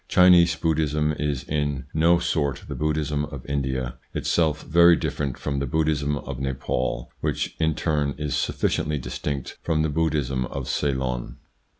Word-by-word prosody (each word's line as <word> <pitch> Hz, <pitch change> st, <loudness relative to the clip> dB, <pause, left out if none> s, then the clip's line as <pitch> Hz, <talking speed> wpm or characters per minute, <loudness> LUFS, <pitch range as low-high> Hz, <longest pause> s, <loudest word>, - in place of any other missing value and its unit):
Chinese 90 Hz, -2 st, +6 dB
Buddhism 75 Hz, -2 st, +1 dB
is 70 Hz, -2 st, -1 dB
in 70 Hz, -3 st, -2 dB
no 85 Hz, +2 st, +4 dB
sort 80 Hz, -5 st, -1 dB
the -, -, -4 dB
Buddhism 75 Hz, -1 st, -1 dB
of 70 Hz, -4 st, -9 dB
India, 65 Hz, -3 st, -2 dB, 0.2 s
itself 80 Hz, -2 st, +1 dB
very 85 Hz, +1 st, +6 dB
different 70 Hz, -5 st, -2 dB
from 70 Hz, -2 st, -2 dB
the 70 Hz, -, -2 dB
Buddhism 75 Hz, 0 st, +1 dB
of 70 Hz, -3 st, -6 dB
Nepaul, 65 Hz, -2 st, -2 dB
which -, -, -2 dB
in 80 Hz, -1 st, +2 dB
turn 75 Hz, -4 st, 0 dB
is 75 Hz, -1 st, -2 dB
sufficiently 75 Hz, -1 st, 0 dB
distinct 70 Hz, +1 st, -4 dB
from 80 Hz, -2 st, +1 dB
the 80 Hz, -, +1 dB
Buddhism 75 Hz, -5 st, 0 dB
of 70 Hz, -2 st, -5 dB
Ceylon. 65 Hz, -3 st, -1 dB
75 Hz, 150 wpm, -24 LUFS, 70-80 Hz, 0.2 s, Chinese